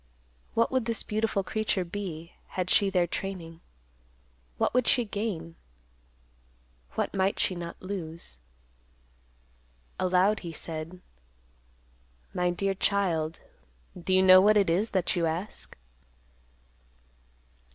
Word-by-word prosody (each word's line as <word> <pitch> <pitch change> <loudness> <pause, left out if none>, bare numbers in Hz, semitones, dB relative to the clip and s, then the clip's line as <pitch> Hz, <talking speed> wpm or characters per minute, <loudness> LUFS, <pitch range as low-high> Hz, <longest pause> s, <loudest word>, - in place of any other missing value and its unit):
What 230 - +3
would 260 -3 +1
this 230 -1 -1
beautiful 215 -2 0
creature 210 -2 -1
be, 170 -3 -6
had 180 -1 -3
she 200 -2 +5
their 180 -2 +2
training? 170 -2 -5 1.0
What - - +1
would 250 0 +2
she 245 -3 +5
gain? 195 -6 -4 1.4
What - - -1
might 195 0 +1
she - - +1
not 170 -1 -6
lose? 170 - -6 1.6
Aloud 185 +3 +3
he 170 - -6
said, 165 +3 -6 1.3
"My 180 0 +1
dear 195 +3 0
child, 175 -5 0 0.5
do 180 +1 -4
you 185 0 +5
know 185 0 +9
what 210 +2 +5
it 195 -5 +3
is 200 +7 +1
that 185 -3 0
you 170 -2 +1
ask?" 170 +6 -5
185 Hz, 115 wpm, -28 LUFS, 170-205 Hz, 1.6 s, know